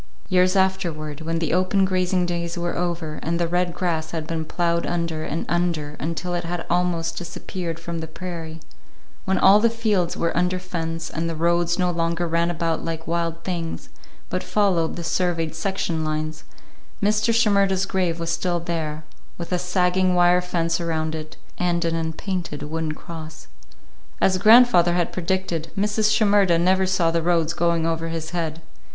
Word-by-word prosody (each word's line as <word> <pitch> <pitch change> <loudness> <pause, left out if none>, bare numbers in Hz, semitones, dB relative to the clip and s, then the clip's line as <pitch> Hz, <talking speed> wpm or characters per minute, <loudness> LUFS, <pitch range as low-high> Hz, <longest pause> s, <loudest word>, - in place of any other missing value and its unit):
Years 185 0 +3
afterward, 170 -6 0
when 165 +1 -2
the 165 -2 -1
open 185 +2 +3
grazing 185 -1 +1
days 170 0 -3
were 175 0 -2
over, 170 -3 -2
and 170 +1 -1
the 170 - +1
red 175 +1 0
grass 165 -3 -1
had 160 -2 -4
been 160 0 -3
ploughed 170 +1 0
under 170 -2 -2
and 165 - -3
under 170 -4 -1
until 165 +3 -3
it 175 - -1
had 170 0 -4
almost 170 -2 0
disappeared 170 0 -5
from 170 0 -5
the 160 - -5
prairie; 165 -1 -7 0.6
when 190 -1 +1
all 195 +2 +7
the 230 +2 +4
fields 215 -6 0
were 170 - 0
under 180 +1 +1
fence, 165 -2 -4
and 165 +1 -2
the 165 - -3
roads 170 +1 +1
no 180 -1 +1
longer 170 0 -1
ran 170 +1 +1
about 165 -1 -1
like 165 -1 -4
wild 165 0 -2
things, 170 -3 -4 0.4
but - - -2
followed 185 -6 +1
the 170 - -5
surveyed 165 -1 0
section 165 -1 -2
lines, 155 0 -3 0.5
Mr. 210 +2 +2
Shimerda's 200 -4 +3
grave 180 -4 -1
was 165 0 -2
still 175 +1 0
there, 160 -2 -3 0.3
with 170 +1 -7
a 180 - +1
sagging 180 +1 +2
wire 175 0 +5
fence 170 -1 -1
around 160 -2 -1
it, 155 0 -7 0.2
and 175 -1 +1
an 165 - 0
unpainted 165 0 -3
wooden 160 +1 -3
cross. 160 -1 -9 0.7
As 185 -1 +3
grandfather 215 -5 +7
had 175 -1 0
predicted, 175 -3 -2
Mrs. 210 +1 +2
Shimerda 205 -5 +4
never 185 +2 +3
saw 180 -3 +2
the 165 0 +1
roads 165 -1 +1
going 170 -1 +1
over 165 0 -1
his 165 -1 -4
head. 165 -2 -3
170 Hz, 170 wpm, -23 LUFS, 165-180 Hz, 0.7 s, all